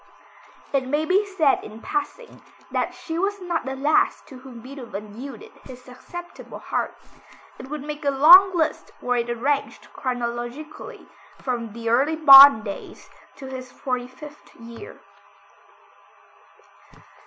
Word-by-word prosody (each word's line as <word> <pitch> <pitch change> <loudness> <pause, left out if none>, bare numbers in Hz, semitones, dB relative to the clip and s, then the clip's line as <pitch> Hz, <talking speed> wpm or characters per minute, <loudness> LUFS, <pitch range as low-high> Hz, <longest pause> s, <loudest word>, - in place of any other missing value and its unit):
It 265 -2 0
may 295 +3 -1
be 390 +4 +1
said 320 -8 +1
in 215 +1 -11
passing, 400 - -5 0.3
that - - -2
she 325 0 -6
was 400 +2 -2
not 345 -6 -3
the 265 0 -4
last 290 +3 +1
to 260 - -12
whom 255 -2 -12
Beethoven 225 -5 -9
yielded 255 -1 -10
his 255 -1 -12
susceptible 345 +8 -11
heart. - - -4 0.6
It 260 - -10
would 300 -1 -6
make 300 +1 -7
a 285 - +1
long 345 +8 +7
list 315 -2 -1
were 245 0 -1
it 235 0 -2
arranged 275 +4 -3
chronologically, 245 +4 -6 0.3
from 235 -4 -5
the 230 0 -5
early 275 +7 +2
Bonn 275 -6 +9
days 200 -2 -9 0.2
to 275 - -11
his 255 -1 -8
forty 250 -2 -4
fifth 295 +4 -14
year. 235 - -12
270 Hz, 135 wpm, -23 LUFS, 245-310 Hz, 0.6 s, Bonn